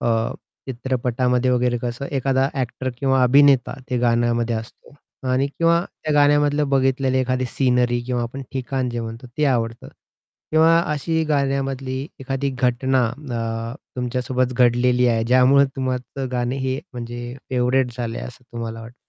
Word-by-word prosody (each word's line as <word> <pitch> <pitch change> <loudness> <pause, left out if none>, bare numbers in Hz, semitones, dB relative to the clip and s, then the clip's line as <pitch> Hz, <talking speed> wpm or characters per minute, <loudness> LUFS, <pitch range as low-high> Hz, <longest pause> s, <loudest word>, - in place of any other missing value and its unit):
अ, - - -2 0.6
चित्रपटामध्ये 125 0 0
वगैरे 125 -1 +2
कसं 120 +3 -3
एखादा 135 0 +1
ॲक्टर 130 -1 -3
किंवा 135 -1 +2
अभिनेता 135 0 +5 0.2
ते 125 - +1
गाण्यामध्ये 120 0 +1
असतो 110 +5 -10 0.4
आणि 130 +2 +2
किंवा 165 +4 +2 0.2
त्या 155 - 0
गाण्यामधलं 145 0 +3
बघितलेली 135 -1 +2
एखादी 130 0 0
सीनरी 125 -2 +1
किंवा 125 -1 -1
आपण 130 +4 -5
ठिकाण 130 -1 -2
जे 120 0 -3
म्हणतो 115 +2 -7
ते 150 - +3
आवडतं. 115 -4 -1 0.6
किंवा 160 +1 +5
अशी 160 +2 0
गाण्यामधली 135 -1 -1
एखादी 135 +1 -2
घटना 130 +1 +2
अ, 115 -3 -4 0.2
तुमच्या 125 0 -2
सोबत 130 0 0
घडलेली 125 0 +3
आहे 115 -1 +1
ज्यामुळे 130 +3 +5
तुम्हाचं 130 0 -3
गाणं 125 0 -1
हे 130 0 -2
म्हणजे 120 0 -6 0.2
फेव्हरेट 125 0 +1
झालंय 115 -2 -4
असं 125 +1 -9
तुम्हाला 115 -1 -5
वाटतं? 115 +2 -11
130 Hz, 140 wpm, -22 LUFS, 120-135 Hz, 0.6 s, अभिनेता